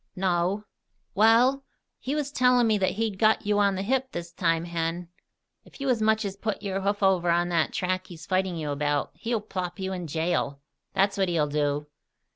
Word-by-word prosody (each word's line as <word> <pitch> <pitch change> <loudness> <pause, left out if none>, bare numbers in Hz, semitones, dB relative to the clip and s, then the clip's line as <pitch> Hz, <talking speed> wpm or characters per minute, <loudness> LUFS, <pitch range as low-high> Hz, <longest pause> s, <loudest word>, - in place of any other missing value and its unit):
"No." 185 +2 0 0.5
"Wal, 235 +6 +4 0.4
he 275 +3 -3
was 290 -2 -2
tellin' 250 -3 +4
me 215 -2 +2
that 190 - +1
he'd 215 -2 -2
got 220 0 +3
you 205 0 +2
on 200 -1 +3
the 190 - -2
hip 260 +4 0
this 170 0 -5
time, 165 -1 +1
Hen. 170 0 -3 0.5
If - - -17
you 275 -1 -1
as 240 -3 +2
much 220 0 +2
as 195 -1 -4
put 205 0 -4
your 195 -1 -2
hoof 200 +1 -1
over 185 -3 +3
on 175 +1 +2
that 165 -2 +1
track 185 0 -2
he's 165 -2 -11
fighting 185 -1 0
you 150 -2 -3
about, 145 0 -1
he'll 230 -2 -2
plop 185 -4 -5
you 190 0 -3
in 180 -2 -5
jail, 160 -2 -1 0.3
that's 195 +1 +1
what 190 -2 +2
he'll 165 -3 +2
do! 145 0 -1
190 Hz, 200 wpm, -26 LUFS, 170-215 Hz, 0.5 s, Wal